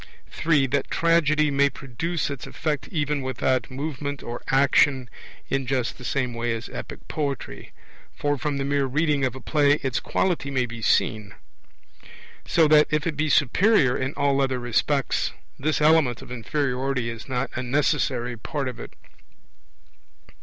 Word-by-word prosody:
(3) 150 -4 +2
That 135 +1 -1
Tragedy 155 -3 +3
may 140 0 +3
produce 145 +5 -3
its 140 - -6
effect 150 -3 -3
even 150 -4 -1
without 130 -1 0
movement 145 +1 -4
or 120 +1 -6
action 135 -2 +3 0.4
in 135 -1 -1
just 130 -2 -1
the - - -10
same 125 -1 -1
way 115 0 -1
as 115 +1 -7
Epic - - -8
poetry; 140 -4 -4 0.4
for 145 0 0
from 145 +1 -2
the 135 - -2
mere 140 -1 +1
reading 145 +1 +1
of 130 -2 0
a - - -7
play 145 +2 +3
its 130 -1 0
quality 175 -7 -1
may 130 -2 0
be 120 -1 -8
seen. 110 -2 +1 1.1
So 165 -2 +4
that, 150 0 +6
if 155 -1 0
it 165 - -1
be 155 +2 0
superior 145 - +4
in 130 +2 -3
all 140 -1 +2
other 130 -1 0
respects, 125 +3 0 0.3
this 155 +3 0
element 150 -5 +3
of - - -13
inferiority 130 0 -1
is 115 +3 -9
not 130 +1 -2
a 130 - -3
necessary 130 -2 0
part 135 +4 -4
of 125 - -6
it. - - -9
140 Hz, 160 wpm, -24 LUFS, 125-150 Hz, 1.1 s, that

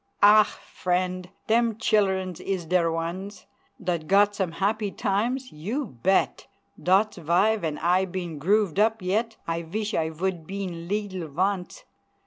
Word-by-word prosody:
Ah! 210 +1 +9 0.3
frient! 185 0 -1 0.2
dem 230 -1 +2
childens 190 -5 +1
is 190 -3 -3
der 170 0 +2
ones 175 +5 -4 0.3
Dot 175 -6 -2
got 205 +1 +4
some 190 -5 -2
happy 205 +4 0
times 240 +8 -1
you 215 - -3 0.2
bet! 190 +6 +1 0.3
Dot's 195 +4 +3
vy 180 +7 +3
ven 160 -8 -3
I 180 +2 +2
been 175 -4 -5
grooved 195 +2 +2
up 220 -1 +2
yet 220 +5 -1
I 165 0 -1
vish 210 +6 -4
I 160 -1 0
vould 170 0 -3
been 185 -4 -5
leedle 195 -4 -3
vonce! 190 - -2
190 Hz, 140 wpm, -26 LUFS, 170-210 Hz, 0.3 s, Ah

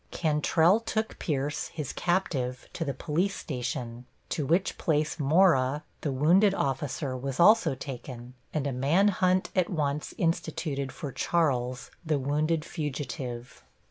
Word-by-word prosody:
Cantrelle 160 +4 +3
took 220 -1 -2
Pierce, 145 -2 -2
his 150 -5 -5
captive, 140 -9 -1
to 165 - -2
the 140 - -1
police 175 +8 -1
station, 120 -2 -5 0.2
to 150 -5 -2
which 175 +5 +1
place 155 0 0
Mora, 145 -3 +3 0.2
the 145 - -1
wounded 180 +9 +4
officer, 135 -1 -2
was 130 +1 -4
also 175 -5 +6
taken, 125 -2 -8 0.2
and 150 -3 -2
a 140 - 0
man 145 +11 +3
hunt 185 -1 +1
at 185 -2 +2
once 150 -3 -2
instituted 160 -4 -1
for 140 +1 -6
Charles, 130 -6 0
the 155 -3 +1
wounded 150 +4 0
fugitive. 130 -5 -5
150 Hz, 135 wpm, -28 LUFS, 135-170 Hz, 0.2 s, also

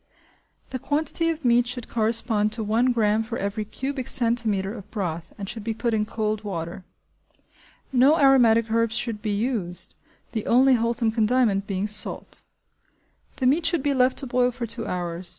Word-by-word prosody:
The 260 - -3
quantity 315 +4 0
of 320 -3 -4
meat 240 0 +4
should 245 -1 -4
correspond 220 -1 0
to 225 0 -1
1 230 +4 +2
gramme 220 -2 +2
for 225 +1 -5
every 200 +2 -3
cubic 265 +4 -5
centimetre 230 -6 +1
of 210 -4 -10
broth 170 -6 -4
and 200 - -6
should 220 +1 -5
be 225 0 -3
put 235 0 -1
in 210 -1 0
cold 215 -1 -2
water. 175 -2 -5 1.1
No 270 +5 +5
aromatic 235 -6 +4
herbs 230 0 +1
should 225 -4 -3
be 215 - -3
used, 205 -4 -1 0.4
the 220 -3 -4
only 260 +3 +5
wholesome 230 -1 +1
condiment 220 -3 +1
being 195 +1 -2
salt. 210 0 -1 0.9
The 260 - -3
meat 305 +7 +3
should 330 -4 0
be 285 -1 +1
left 255 -1 +2
to 275 - -3
boil 250 0 +2
for 240 -1 -5
two 230 -1 -4
hours. 175 0 -3
230 Hz, 170 wpm, -24 LUFS, 210-250 Hz, 1.1 s, No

